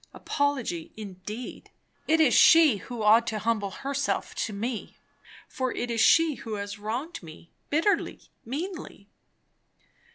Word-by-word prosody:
Apology 275 - -2
indeed! 210 +3 -8 0.4
It 320 +1 +3
is 305 -6 +5
she 320 -9 +7
who 235 +2 -6
ought 220 +2 +5
to 220 - -2
humble 215 -2 -1
herself 275 +8 -3
to 220 - -3
me, 220 +3 -5 0.5
for 260 -4 -2
it 240 0 -3
is 230 -1 0
she 320 +5 +5
who 220 -2 -5
has 205 0 -6
wronged 245 +11 -4
me, 165 0 -13 0.2
bitterly, 325 +8 +1 0.2
meanly. 295 - -6
235 Hz, 130 wpm, -27 LUFS, 210-285 Hz, 0.5 s, she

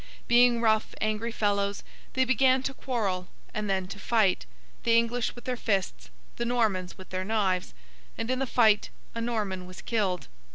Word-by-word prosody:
Being 240 0 +5
rough 220 -1 +2
angry 215 +2 -1
fellows, 200 -2 0 0.3
they 260 0 +3
began 260 +1 +4
to 270 - -2
quarrel, 205 -10 -2 0.3
and 210 -1 -2
then 190 -1 +1
to 200 - -7
fight—the 185 - +1
English 235 +1 0
with 240 - -11
their 255 - -1
fists; 190 - -1 0.3
the - - -1
Normans 220 -7 0
with 185 - -12
their 185 0 -2
knives—and, 185 - -3
in 255 - 0
the 270 - 0
fight, 220 -4 +4 0.2
a 230 - -3
Norman 205 -6 -2
was 185 0 -10
killed. 195 -6 0
215 Hz, 160 wpm, -28 LUFS, 185-235 Hz, 0.3 s, Being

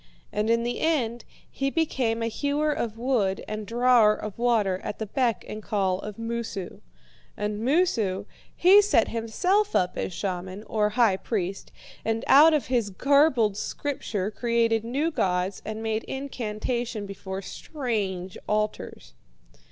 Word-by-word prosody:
And 210 +1 0
in 230 0 +3
the 240 +1 -2
end 245 -8 0 0.2
he 275 0 -2
became 255 -7 0
a - - 0
hewer 285 +6 0
of 225 -5 -3
wood 230 -6 0
and 215 -1 -5
drawer 235 -2 +4
of 215 +1 -7
water 215 -6 +2
at - - -4
the 220 - -3
beck 230 -3 0
and 215 - -6
call 195 -3 0
of 210 0 -7
Moosu. 230 -5 -5 0.6
And 210 0 -2
Moosu 235 - +1 0.3
he 385 +4 +7
set 410 - +3
himself 360 - 0
up 180 0 +2
as - - -2
shaman, 185 +1 -4
or 210 -1 0
high 225 -6 +4
priest, 195 -3 -3 0.3
and 225 +1 -1
out 310 +3 +7
of 295 - 0
his 240 -5 0
garbled 260 - +3
Scripture 215 -7 -3
created 230 0 +1
new 280 +8 -1
gods 185 - -1
and 220 +1 -5
made 220 0 -1
incantation 240 -3 -3
before 195 -1 -6
strange 200 - -4
altars. 210 - -2
225 Hz, 145 wpm, -26 LUFS, 205-255 Hz, 0.6 s, he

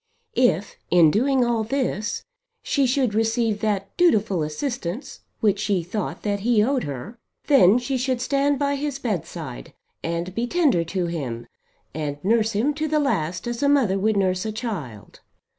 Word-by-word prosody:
If 205 -6 +1
in 170 -3 +6
doing 255 - +2
all 235 -2 +1
this 230 -3 -2 0.4
she 275 -2 +1
should 250 -3 +1
receive 225 -1 +1
that 200 -3 -1
dutiful 215 - +3
assistance 180 - -4 0.2
which 205 -2 +2
she 200 -4 0
thought 205 +5 -4
that 205 -1 -1
he 220 0 +3
owed 260 +2 0
her, 145 - -7 0.3
then 240 -8 +6
she 250 +2 -1
should 255 -1 0
stand 280 +3 +1
by 285 0 0
his 285 -1 -3
bed 215 - -2
side, - - -8 0.3
and 170 +2 -3
be 235 +4 -1
tender 285 - +2
to 180 +1 -2
him, 130 -9 -4 0.5
and 145 -1 -3
nurse 225 +1 +2
him 240 +9 +1
to 310 +1 -2
the 305 0 +1
last 185 - -1
as 240 -1 -3
a 280 - +3
mother 235 -10 +3
would 215 +1 +1
nurse 185 -1 +1
a 220 - -3
child. 190 - -6
220 Hz, 170 wpm, -23 LUFS, 185-260 Hz, 0.5 s, in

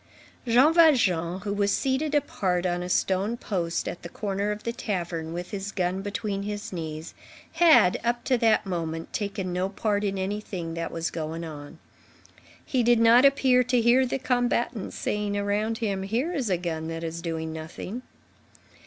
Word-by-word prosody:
Jean 255 +7 +5
Valjean, 190 - +4
who 200 0 -3
was 200 0 +1
seated 280 +5 0
apart 185 -10 0
on 175 -1 0
a 180 - -5
stone 195 +5 +1
post, 175 -7 -2
at - - -5
the 170 - -8
corner 200 +2 -2
of 210 0 -5
the 235 - -2
tavern, 170 -8 -3
with 175 +1 -6
his 200 0 -4
gun 185 0 -1
between 205 0 -3
his 205 0 -5
knees, 160 -1 -6 0.4
had, 320 - +5
up 240 +1 0
to 260 - +2
that 225 -3 +3
moment, 165 -3 -4
taken 200 -3 -3
no 185 +2 0
part 205 0 -1
in 195 -1 -1
anything 190 -3 -4
that 165 0 -4
was 165 0 -3
going 165 0 -4
on. 145 -3 -9 0.9
He 255 - +1
did 240 0 +4
not 230 +3 +6
appear 265 -2 +4
to 250 0 +2
hear 240 +3 +5
the 245 - -1
combatants 245 -4 -1
saying 205 -1 -1
around 205 +2 0
him: 200 -5 -2
"Here 235 - -1
is 265 - -1
a 180 - +2
gun 160 -2 -4
that 165 0 -5
is 165 +1 -4
doing 160 -1 -4
nothing." 160 +8 -6
200 Hz, 175 wpm, -26 LUFS, 175-235 Hz, 0.9 s, not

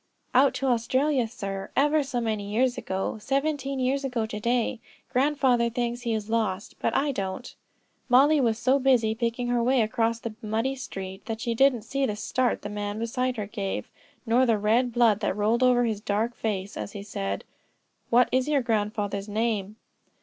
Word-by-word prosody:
"Out 265 +1 +5
to 265 +2 -2
Australia, 255 +2 +1
sir; 195 -4 -5
ever 295 +2 +3
so 265 -3 -2
many 215 -3 -2
years 245 +3 +2
ago; 190 +3 -3
seventeen 275 +2 -1
years 265 +2 0
ago 250 -4 -1
to 215 -1 -5
day. 235 +1 0 0.3
Grandfather 260 -3 +2
thinks 240 +1 -2
he 235 -2 -1
is 210 -1 -4
lost, 220 -2 -1
but - - 0
I 285 +2 +1
don't." 195 +1 -4 0.6
Mollie 280 +4 +5
was 225 -3 +1
so 260 +4 +2
busy 250 -5 +3
picking 235 +2 -2
her 245 -1 +2
way 255 +2 +3
across 225 +1 +1
the 230 -1 -5
muddy 225 +5 -1
street 195 -7 -7
that 225 -1 -3
she 235 0 -1
didn't 250 -2 +3
see 275 +4 -2
the 210 - -2
start 250 +4 -1
the - - -3
man 205 0 -4
beside 250 +2 -1
her 210 - -2
gave, 200 -1 -4 0.3
nor 250 +3 +3
the 225 -2 +3
red 225 +4 +2
blood 230 -3 +3
that 205 -2 -1
rolled 220 +4 +2
over 250 -1 +4
his 215 -3 -2
dark 215 +3 -1
face 200 -3 -3
as 200 - -5
he 200 - -6
said: 100 - -4 0.7
"What 245 +1 +5
is 260 +1 +1
your 290 -3 +2
grandfather's 210 -3 -1
name?" 210 -2 -1
235 Hz, 185 wpm, -26 LUFS, 210-255 Hz, 0.7 s, Out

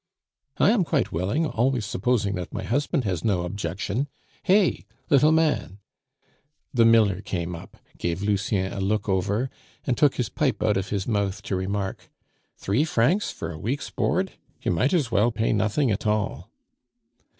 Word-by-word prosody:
"I - - +5
am 225 -5 +3
quite 150 -7 0
willing, 100 - 0
always 125 -4 0
supposing 105 0 0
that 90 -2 -5
my - - -3
husband 140 +3 0
has 90 -6 -2
no 95 -5 +1
objection. 100 - -3 0.3
Hey! 190 - +3 0.3
little 150 +2 +6
man!" 155 -11 +1 1.0
The 115 -3 +5
miller 110 -4 +4
came 90 -3 -3
up, 85 +3 -12 0.2
gave 85 +3 -2
Lucien 100 -1 0
a - - -4
look 105 +3 0
over, 100 +6 0 0.3
and 125 - +1
took 145 0 +3
his 125 - -1
pipe 130 -8 0
out 105 - +3
of 95 +1 -2
his 100 -2 -2
mouth 100 -3 -1
to 95 - -2
remark, 95 +1 -3 0.5
"Three 105 +9 +1
francs 160 - +2
for 80 - -5
a 80 - -8
weeks 135 - -3
board? - - 0 0.3
You - - +1
might 125 - +2
as 150 -10 +1
well 115 +3 +3
pay 115 0 0
nothing 110 +5 +1
at 105 +2 -2
all." 105 -1 -1
105 Hz, 165 wpm, -25 LUFS, 95-130 Hz, 1.0 s, little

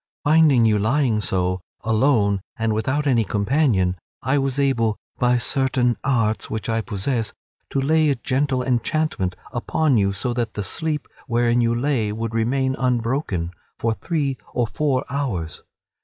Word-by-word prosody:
Finding 150 -6 +5
you 105 -2 +3
lying 115 0 +1
so, 90 -2 0 0.2
alone 110 -3 +2 0.2
and 115 -1 0
without 130 +7 0
any 125 -5 +3
companion, 100 - +1 0.3
I 135 +4 +2
was 135 -1 -1
able, 115 -6 +1 0.2
by 125 0 +3
certain 130 -1 +2
arts 115 -5 0
which 110 -1 -4
I 115 0 0
possess, 110 +1 -2 0.4
to 140 - -1
lay 155 +3 +3
a 140 - +2
gentle 130 +1 0
enchantment 125 - 0 0.2
upon 130 +1 +1
you 100 -1 +2
so 120 +6 -2
that 120 -2 -2
the 105 - -2
sleep 150 - -2 0.2
wherein 120 0 +2
you 115 0 +2
lay 120 -4 0
should 110 +1 -4
remain 130 +4 +1
unbroken 115 - -1 0.3
for 115 -1 0
three 140 -1 -2 0.2
or 120 - +2
four 135 +2 -1
hours. 115 - -3
120 Hz, 150 wpm, -22 LUFS, 110-135 Hz, 0.4 s, Finding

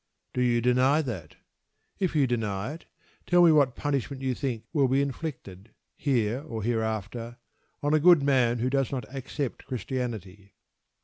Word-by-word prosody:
Do 125 - -1
you 120 -1 +2
deny 130 +5 +3
that? 95 - -6 0.6
If 185 -4 0
you 145 -3 +4
deny 110 -1 -2
it, 165 - -12 0.4
tell 175 0 +5
me 170 - +7
what 140 -5 +4
punishment 140 -2 -2
you 130 -1 0
think 125 -4 -3
will 140 -4 +3
be 135 +2 +2
inflicted, 130 - -5 0.2
here 125 -3 0
or 115 -8 -6
hereafter 115 +1 -2 0.5
on 145 +1 +1
a 155 - +5
good 170 -2 +6
man 130 -4 +3
who 120 +2 0
does 135 -2 +1
not 130 -5 -3
accept 135 0 -5
Christianity. 110 -5 -5
125 Hz, 160 wpm, -27 LUFS, 115-140 Hz, 0.6 s, me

